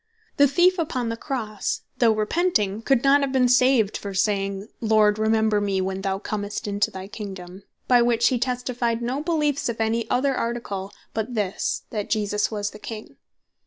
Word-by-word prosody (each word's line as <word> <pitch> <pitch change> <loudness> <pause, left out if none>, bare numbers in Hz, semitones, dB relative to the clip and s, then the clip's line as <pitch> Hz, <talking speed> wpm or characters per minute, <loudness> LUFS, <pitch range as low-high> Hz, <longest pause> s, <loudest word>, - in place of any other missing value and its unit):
The 285 - +6
Thief 355 +6 +3
upon 255 -8 -1
the 230 - -2
Crosse 225 -5 -3 0.2
though 235 -2 +5
repenting, 215 - 0
could 260 0 +2
not 280 +1 +5
have 275 -1 0
been 260 -2 +3
saved 250 -4 +4
for 200 -1 -5
saying, 195 0 0
"Lord 215 -1 +3
remember 220 -1 +2
me 200 -2 0
when 190 0 -2
thou 195 -1 -1
commest 205 0 -4
into 205 0 0
thy 190 0 -8
Kingdome;" 195 -3 -8 0.3
by 245 -1 +5
which 235 -1 +3
he 255 -3 0
testified 245 -2 -1
no 255 +4 -2
beleefe 300 -5 0
of 230 -1 -4
any 225 +1 0
other 270 +2 +2
Article, 230 -6 -3 0.2
but 225 +2 -3
this, 205 -2 -1
That 210 -3 -3
Jesus 210 -1 0
Was 210 -1 -3
The 210 - -12
King. 215 0 -8
220 Hz, 175 wpm, -24 LUFS, 205-250 Hz, 0.3 s, The